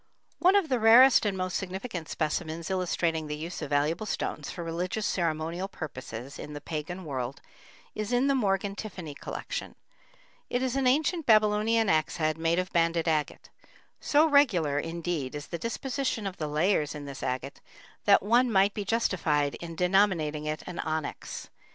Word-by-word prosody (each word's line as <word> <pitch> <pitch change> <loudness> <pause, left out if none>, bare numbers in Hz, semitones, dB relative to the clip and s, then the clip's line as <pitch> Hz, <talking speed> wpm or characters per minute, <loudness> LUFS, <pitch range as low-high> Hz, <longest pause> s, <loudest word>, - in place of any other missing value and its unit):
One 370 +2 +5
of 395 -5 +3
the 255 -4 +1
rarest 230 +1 +7
and 195 -2 -1
most 185 -1 -2
significant 190 -2 -5
specimens 160 +2 -2
illustrating 170 -4 0
the 150 0 -4
use 165 +4 -6
of 150 - -4
valuable 150 +8 0
stones 150 -6 -3
for 175 - -6
religious 180 +6 -2
ceremonial 170 +1 -1
purposes 130 - -7
in 150 - -7
the 145 - -5
pagan 165 +4 -5
world 130 -2 -4 0.5
is 215 +2 -4
in 245 +2 +3
the 275 - +3
Morgan 200 -5 0
Tiffany 185 -8 -7
collection. - - -6 0.7
It 245 +1 0
is 260 -1 -1
an 270 -2 +2
ancient 310 +4 +1
Babylonian 215 +1 +4
axe 160 -1 +1
head 155 -1 0
made 165 +1 +1
of 185 +1 -2
banded 170 -1 +2
agate. 155 -2 -1 0.5
So 295 +2 +4
regular, 185 - +3
indeed, 165 -4 -3
is 145 - -5
the 170 - -6
disposition 245 - -2
of 190 -2 -4
the 155 - -3
layers 150 0 +1
in 145 -1 -7
this 140 -1 -8
agate 130 +2 -4 0.4
that 200 -2 +6
one 240 +4 +3
might 200 0 +4
be 205 - -3
justified 165 -10 +1
in 165 -1 -7
denominating 180 -4 +2
it 155 0 -3
an 180 -2 -7
onyx. 155 -1 -4
175 Hz, 170 wpm, -28 LUFS, 155-215 Hz, 0.7 s, rarest